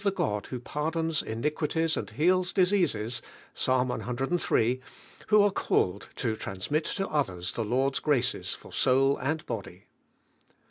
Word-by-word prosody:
the 200 - +4
God 105 - -1
who 125 - -5
pardons 160 +4 -1
iniquities 150 +7 -1
and 100 - -4
heals 180 - +2
diseases 170 - +2 0.3
IPs. - - -1
eiii.), 130 0 +1 0.5
who 210 -1 +6
are 205 - +4
called 100 - 0
to 115 -4 -1
transmit 110 - -2
to 195 -1 -2
others 95 - -1
the 115 - -2
Lord's 130 +5 +1
graces 130 -5 +1
fur - - -14
soul 135 +2 +3
Bad 155 +4 -2
body. 100 -5 -6
135 Hz, 135 wpm, -28 LUFS, 115-160 Hz, 0.5 s, who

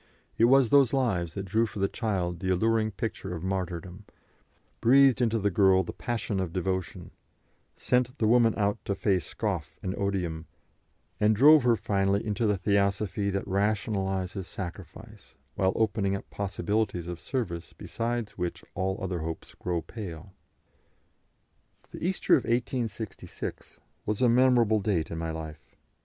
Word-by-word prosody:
It 115 - +4
was 130 -1 +5
those 140 -2 +5
lives 100 -11 0
that 100 -1 -4
drew 110 +5 +1
for 110 - -10
the 100 0 +2
child 95 -6 -2
the 95 - -2
alluring 110 +4 +2
pictures 100 -2 -5
of 85 -1 -6
martyrdom, 95 0 -4 0.7
breathed 130 0 +5
into 115 -1 +2
the 100 -1 0
girl 95 0 +4
the - - -6
passion 115 -4 -3
of 90 -3 -2
devotion, 95 0 -3 0.7
sent 125 0 0
the 110 - +1
woman 115 0 +4
out 100 -1 0
to 100 - -1
face 95 -4 0
scoff 85 -10 -3
and 95 - -2
odium, 90 -5 -2 0.7
and 105 +1 +4
drove 150 +6 +7
her 120 -1 +4
finally 100 -1 0
into 110 +1 0
the 105 -1 +2
Theosophy 100 +1 0
that 100 0 -2
rationalises 95 -2 -1
sacrifice, 100 +4 -9 0.2
while 95 0 +2
opening 105 -3 +1
up 100 - -7
possibilities 100 -2 -1
of 85 -1 -6
service 85 - -4
beside 115 -1 -3
which 90 -2 -4
all 95 +1 -1
other 90 -2 -2
hopes 80 0 -6
grow 85 -2 -3
pale. 95 -4 -8 1.6
The - - -8
Easter 185 +2 +1
of 130 - +5
1866 115 -3 -4 0.3
was 105 0 -1
a - - +6
memorable 120 -3 +4
date 95 -6 -1
in 80 - -4
my 80 0 -3
life. 80 -1 -8
100 Hz, 150 wpm, -28 LUFS, 95-115 Hz, 1.6 s, drove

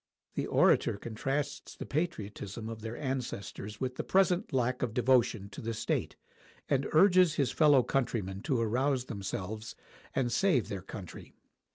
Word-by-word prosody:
[The - - -2
orator - - +3
contrasts 135 +7 -3
the - - -7
patriotism 110 - -3
of 115 -1 -7
their 115 +1 -5
ancestors 115 -6 -4
with 130 -1 -3
the - - -2
present 190 0 +2
lack 125 -1 0
of 120 -3 -2
devotion 120 -4 +3
to - - -9
the 115 0 -3
state, - - -1 0.5
and 135 -1 +1
urges 180 -1 +5
his 135 -5 +1
fellow 145 -5 +5
countrymen 105 -8 -1
to 130 -4 +2
arouse 125 +3 +1
themselves 105 0 -5 0.4
and 125 -3 +1
save 155 - +2
their 100 -2 -4
country. 95 -1 -9
125 Hz, 150 wpm, -31 LUFS, 110-140 Hz, 0.5 s, urges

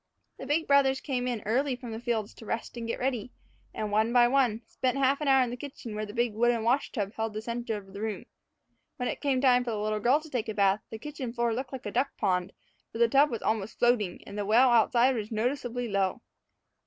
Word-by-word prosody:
The - - -7
big 320 +3 +1
brothers 275 -1 +4
came 250 -3 -2
in 240 -4 -3
early 255 +5 +1
from 245 -2 -8
the 220 - -5
fields 230 -3 -2
to 225 - -13
rest 230 +2 -4
and 235 -1 -5
get 230 - -2
ready, 250 -2 -2 0.4
and, 215 -1 -4
one 220 +2 +2
by 240 0 +6
one, 245 -4 +2
spent 255 +1 -1
half 275 +2 +2
an 300 - -1
hour 265 -1 +5
in 245 - -3
the - - -3
kitchen, 250 -3 -8
where 215 0 -4
the 205 - -9
big 240 -2 +1
wooden 235 +1 +2
wash 255 +5 +1
tub 205 -4 -3
held 220 -1 -3
the 215 - -3
center 235 -1 -3
of 195 -2 -12
the 200 - -7
room. 220 -1 -3 0.7
When 250 - -3
it - - -4
came 270 -3 +1
time 250 -2 +4
for 245 - -4
the 220 - -2
little 215 0 -1
girl 250 +7 +3
to 315 - -12
take 230 -3 -2
a 215 - -4
bath, 200 0 +3
the 220 - -6
kitchen 260 -1 -6
floor 235 -1 0
looked 255 +2 -4
like 265 -2 -7
a 205 - -3
duck 260 +5 -1
pond, 180 0 0 0.4
for - - -7
the 235 0 +5
tub 275 +5 +4
was 230 - -4
almost 220 -1 -1
floating, 225 -7 +1
and 200 - -9
the - - 0
well 235 +5 +5
outside 240 +2 +4
was 215 -1 -4
noticeably 245 +1 -2
low. 195 +2 0
235 Hz, 250 wpm, -28 LUFS, 215-255 Hz, 0.7 s, by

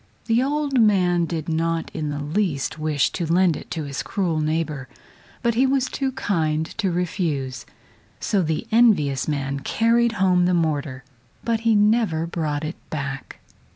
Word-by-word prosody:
The 230 +1 +2
old 280 -1 +1
man 180 -5 +3
did 165 -2 -4
not 165 0 -1
in 155 -2 -3
the 145 - -3
least 155 -1 -1
wish 155 -2 +1
to 165 -2 -3
lend 180 -2 +4
it - - -9
to 160 - -3
his 140 -1 -4
cruel 175 -6 -1
neighbor, 155 -3 -2 0.5
but 235 -1 +2
he 255 +4 +3
was 265 -1 +2
too 265 0 -2
kind 160 -8 0
to 195 -4 +1
refuse. 160 -7 -2 0.5
So 200 - +1
the 160 -2 -1
envious 200 - +3
man 140 -2 -2
carried 230 +9 +2
home 185 -3 +3
the 180 - +2
mortar, 145 -5 -1 0.4
but 230 -1 0
he 225 -1 +2
never 210 -6 +2
brought 155 -3 -2
it 155 - -5
back. 140 -3 -5
165 Hz, 160 wpm, -23 LUFS, 150-215 Hz, 0.5 s, lend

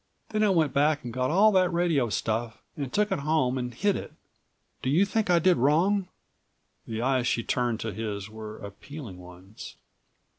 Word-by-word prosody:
Then 215 -1 -1
I 210 - +4
went 160 -7 +2
back 145 +1 +2
and 120 -1 -6
got 125 +1 0
all 200 +7 +5
that 185 -2 +3
radio 170 -8 +1
stuff 110 +3 -2
and 140 -3 -4
took 210 +5 +1
it - - 0
home 140 -3 +1
and 125 0 -3
hid 200 - 0
it. - - -6 0.7
Do 130 - -1
you 170 +8 +4
think 210 0 -1
I 175 - +5
did 180 +2 +4
wrong?" 180 +9 +2 0.8
The 115 0 -3
eyes 130 -1 +1
she 115 - 0
turned 120 -2 -1
to 110 -2 -4
his 105 -3 -4
were 110 0 -9
appealing 100 - -9
ones. 90 +3 -12
135 Hz, 185 wpm, -27 LUFS, 115-175 Hz, 0.8 s, all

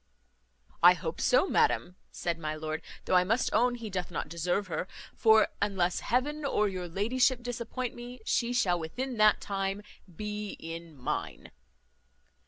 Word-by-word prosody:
"I 175 +1 +8
hope 165 -1 -5
so, 255 +9 +4
madam," 180 - +2 0.2
said 170 -1 -3
my 155 -1 -3
lord; 155 0 -4 0.2
"though - - -1
I 180 0 +6
must 225 +7 0
own 245 0 +3
he 230 -2 -6
doth 185 -1 -3
not 160 -3 -4
deserve 175 +4 -1
her; 175 0 -3 0.3
for, 220 -1 +5
unless 190 -3 +1
heaven 295 +5 0
or 210 -7 +2
your 185 -2 -4
ladyship 245 +7 +1
disappoint 245 +1 -4
me, 245 +1 -9
she 235 0 +1
shall 185 -8 +2
within 250 +10 -4
that 215 0 +5
time 195 0 -3 0.3
be 210 0 -4
in 165 -1 -8
mine." 125 -2 -4
200 Hz, 155 wpm, -30 LUFS, 175-240 Hz, 0.3 s, I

